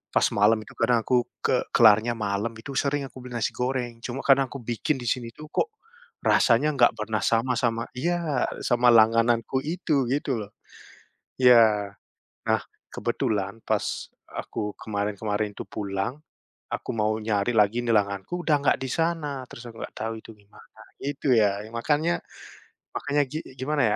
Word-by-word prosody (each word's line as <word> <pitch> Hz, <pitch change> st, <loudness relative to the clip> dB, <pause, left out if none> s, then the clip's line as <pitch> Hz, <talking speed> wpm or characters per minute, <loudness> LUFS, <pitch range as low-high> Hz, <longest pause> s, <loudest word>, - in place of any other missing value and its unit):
pas -, -, +5 dB
malam 105 Hz, +2 st, +4 dB
itu -, -, -14 dB
kadang 120 Hz, -1 st, +3 dB
aku 125 Hz, -, +3 dB, 0.3 s
ke -, -, +3 dB, 0.2 s
kelarnya 110 Hz, +1 st, +6 dB
malam 105 Hz, +1 st, -2 dB
itu, 110 Hz, +5 st, -9 dB
sering 140 Hz, +1 st, 0 dB
aku 130 Hz, -, -13 dB
beli 125 Hz, -, -9 dB
nasi 115 Hz, -, 0 dB
goreng 125 Hz, -2 st, -2 dB
cuma 130 Hz, +2 st, -4 dB
karena 135 Hz, 0 st, +5 dB
aku 135 Hz, +2 st, -8 dB
bikin 120 Hz, +5 st, -1 dB
di 120 Hz, -, -6 dB
sini 120 Hz, -2 st, -2 dB
tuh, 155 Hz, -, -10 dB
kok 450 Hz, -, 0 dB, 0.5 s
rasanya 150 Hz, -, +4 dB
enggak 120 Hz, -3 st, +5 dB
pernah 110 Hz, 0 st, -2 dB
sama, 120 Hz, +2 st, +2 dB
sama 115 Hz, -1 st, 0 dB
iya, 165 Hz, -2 st, 0 dB, 0.2 s
sama 120 Hz, 0 st, +2 dB
langgananku 115 Hz, +3 st, +4 dB
itu, 155 Hz, -4 st, 0 dB
gitu 135 Hz, -3 st, 0 dB
loh. 105 Hz, -, -13 dB, 0.9 s
Iya, 110 Hz, -5 st, +6 dB, 0.6 s
nah -, -, +2 dB, 0.3 s
kebetulan 105 Hz, +1 st, -2 dB
pas -, -, 0 dB, 0.5 s
aku 105 Hz, -1 st, -5 dB
kemarin 105 Hz, -1 st, -3 dB
kemarin 105 Hz, -1 st, -2 dB
itu -, -, -5 dB
pulang 100 Hz, +7 st, -3 dB, 0.5 s
aku -, -, -3 dB
mau 110 Hz, 0 st, +2 dB
nyari 105 Hz, +1 st, 0 dB
lagi 105 Hz, +3 st, +4 dB
langgananku 110 Hz, -, 0 dB
udah 150 Hz, -2 st, +4 dB
nggak -, -, +3 dB
di 130 Hz, -, -3 dB
sana, 160 Hz, -5 st, -1 dB
terus 120 Hz, -, -10 dB
aku 115 Hz, -, -12 dB
nggak -, -, -8 dB
tahu 110 Hz, +1 st, -3 dB
itu -, -, -12 dB
gimana, 100 Hz, 0 st, -19 dB, 0.2 s
gitu 140 Hz, -1 st, -1 dB
ya. 100 Hz, -3 st, +3 dB, 0.2 s
Makanya, 150 Hz, +8 st, 0 dB, 0.8 s
makanya 145 Hz, +1 st, +1 dB
gini, 155 Hz, +5 st, -6 dB
gimana 145 Hz, +2 st, 0 dB
120 Hz, 160 wpm, -26 LUFS, 110-135 Hz, 0.9 s, kelarnya